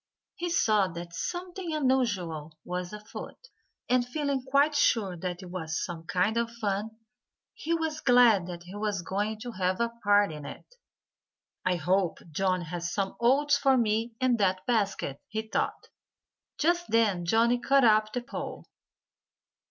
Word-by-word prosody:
He 350 - -3
saw 215 - +3
that 170 -1 -8
something 355 - -4
unusual 195 - 0
was 180 0 -4
afoot. 210 0 -8 0.5
And 250 0 +3
feeling 280 +1 -2
quite 280 +3 +3
sure 220 -9 +2
that 180 +1 -5
it 180 - -10
was 160 -3 -3
some 165 -2 -8
kind 190 +5 +1
of 235 0 +1
fun, 220 -1 -3 0.6
he 335 +2 -1
was 320 -2 -2
glad 240 -8 +5
that 175 -1 -7
he 180 +2 -11
was 205 -3 -2
going 205 +5 -2
to 245 - -5
have 185 -2 -1
a 235 0 0
part 205 -3 +4
in 150 -1 -8
it. - - -9 1.0
"I 180 0 +2
hope 180 +2 +1
Johnnie 185 +1 0
has 170 +1 -4
some 195 -1 -2
oats 280 +4 +3
for 270 -2 +4
me 225 0 0
in 255 -2 +2
that 185 -3 +1
basket," 200 - -1
he 220 0 -3
thought. 220 - -3 0.7
Just 345 +2 +1
then 215 -6 +2
Johnnie 230 +7 +3
caught 275 +2 +3
up 215 -1 +4
the 245 - -2
pole. 240 - -6
215 Hz, 155 wpm, -28 LUFS, 180-250 Hz, 1.0 s, glad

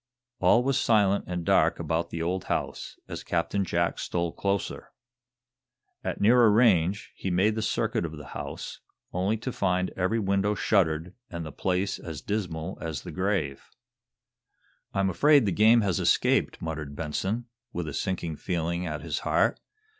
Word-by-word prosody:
All 120 - +5
was 135 0 +1
silent 100 -5 +3
and 90 -2 -3
dark - - +4
about 85 +1 -1
the 85 -1 -3
old 90 +2 -2
house, - - -3
as - - -6
Captain 90 +3 0
Jack 85 -1 0
stole 85 -1 -1
closer. 100 +1 -2 1.1
At - - -3
nearer 115 +2 +6
range 105 -4 +3
he 95 - -4
made 95 +5 +3
the 110 - -2
circuit 110 - 0
of 80 -2 -5
the 75 -1 -10
house, - - -6 0.3
only 95 +5 +1
to 125 +4 -4
find 90 -4 0
every 95 +5 0
window 100 0 +1
shuttered, 85 -4 +1 0.2
and 85 -1 -5
the 75 - -6
place 95 +5 -1
as 80 -3 -7
dismal 95 -4 -3
as 80 -5 -4
the - - -7
grave. 95 -8 -2 1.2
"I'm 95 -1 +1
afraid 145 - +5
the 100 - +1
game 110 +5 +5
has 100 -4 0
escaped," - - +2
muttered 75 -3 -4
Benson, 95 +10 -2 0.3
with 85 -2 -4
a 75 - -5
sinking 85 -4 -2
feeling 85 0 -2
at 75 -1 -4
his - - -2
heart. - - +1
95 Hz, 160 wpm, -27 LUFS, 85-105 Hz, 1.2 s, nearer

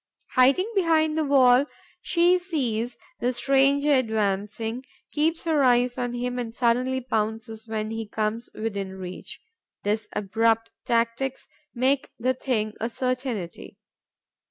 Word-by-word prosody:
Hiding 275 +10 +4
behind 320 -5 +2
the 315 - +1
wall, 270 -1 +5 0.3
she 355 +1 +3
sees 250 -10 -2 0.2
the 245 - +1
stranger 275 +3 +3
advancing, 220 0 -1 0.3
keeps 320 +2 +1
her 315 -3 +2
eyes 245 -1 +3
on 245 -1 -2
him 250 +1 -2
and 230 -2 -5
suddenly 255 +2 +1
pounces 220 -1 -3
when 215 -1 -3
he 225 -1 -4
comes 215 +2 -2
within 200 -3 -4
reach. 185 -1 -8 0.4
These 210 +1 -1
abrupt 225 +3 +1
tactics 235 +3 0 0.3
make 265 +3 +1
the 255 +3 +1
thing 225 -5 -1
a 230 - -1
certainty. 250 -8 -3
245 Hz, 125 wpm, -25 LUFS, 220-270 Hz, 0.4 s, wall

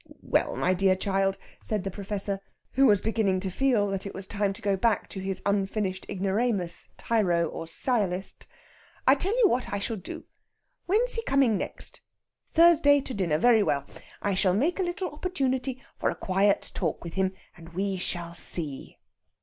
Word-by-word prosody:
"Well, - - +1
my 185 - +2
dear 190 0 +3
child," 195 0 0 0.2
said 210 -4 0
the 195 - -3
Professor, 200 0 -3 0.3
who 270 +1 +4
was 205 -4 +4
beginning 215 -4 +1
to 190 -1 -3
feel 245 -1 +2
that 195 0 -3
it - - -8
was 195 0 -6
time 200 0 -1
to 215 - -11
go 200 -1 +2
back 215 +2 +1
to 195 - -6
his 190 0 -3
unfinished 195 -1 -1
ignoramus, 195 -1 -1
tyro, 180 -7 +1
or 165 - -6
sciolist; 195 -1 -1 0.6
"I 265 - +7
tell 385 - 0
you - - +8
what 255 - -1
I 200 - -1
shall 215 +3 -3
do. 185 - -8 0.6
When's 450 +7 +3
he 460 - +1
coming 270 -5 +3
next? - - -5 0.5
Thursday, 325 -4 +6
to 260 - -6
dinner. 175 -8 +1
Very 230 +4 +5
well. 140 -8 0 0.4
I 200 - +1
shall 185 -1 +2
make 310 - +1
a - - +2
little 355 -1 -3
opportunity 265 -6 -2 0.2
for - - +1
a - - -3
quiet 195 +2 +1
talk 165 -5 -2
with 170 -1 -7
him, 190 -1 +1 0.2
and 165 -1 -13
we 195 0 -1
shall 170 -2 -3
see." 155 -5 -3
200 Hz, 180 wpm, -27 LUFS, 190-250 Hz, 0.6 s, you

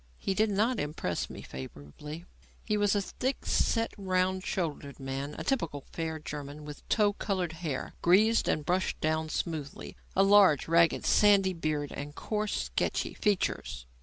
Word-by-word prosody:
He 195 - -1
did 215 +2 +2
not 215 +4 +1
impress 145 - -2
me - - -9
favourably. 75 - -9 0.4
He 210 - +1
was 205 -1 +2
a 200 - +1
thick 260 +7 -3
set, 230 -1 +1
round 185 -1 0
shouldered 150 -7 -3
man, 135 +2 -4
a - - -4
typical 165 - -1
fair 160 -1 -3
German 150 -1 -7
with 150 -1 -10
tow 210 -2 +3
coloured 185 -5 -2
hair, 160 -5 -4
greased 215 +6 +4
and 150 - 0
brushed 180 +3 0
down 155 0 0
smoothly, 155 -4 -4 0.2
a 195 - +5
large, 195 -7 +6
ragged, 165 0 +4
sandy 200 -2 +5
beard 155 -3 -2
and 145 +1 -6
coarse, 215 -1 -2
sketchy - - -1
features. 195 - -1
170 Hz, 155 wpm, -30 LUFS, 150-200 Hz, 0.4 s, large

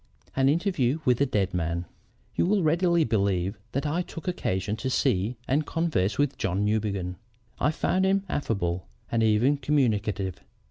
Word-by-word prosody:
AN 135 0 +4
INTERVIEW 155 - +1
WITH 125 -1 +3
A 140 - +4
DEAD 100 -7 0
MAN 85 0 -1 0.5
"You - - +1
will 200 -1 +2
readily 170 +1 +3
believe 100 - 0
that 140 +3 -1
I 155 +4 0
took 170 0 -8
occasion 100 - -1
to 130 - -2
see 120 -3 +1
and 145 +4 +2
converse 150 - 0
with 145 -1 0
John 95 +4 0
Newbegin. 100 -4 -1 0.4
I - - +3
found 185 +4 +1
him 195 0 +2
affable 90 - -2 0.2
and 115 - +2
even 110 +6 +3
communicative. 110 - 0
125 Hz, 155 wpm, -27 LUFS, 100-150 Hz, 0.5 s, AN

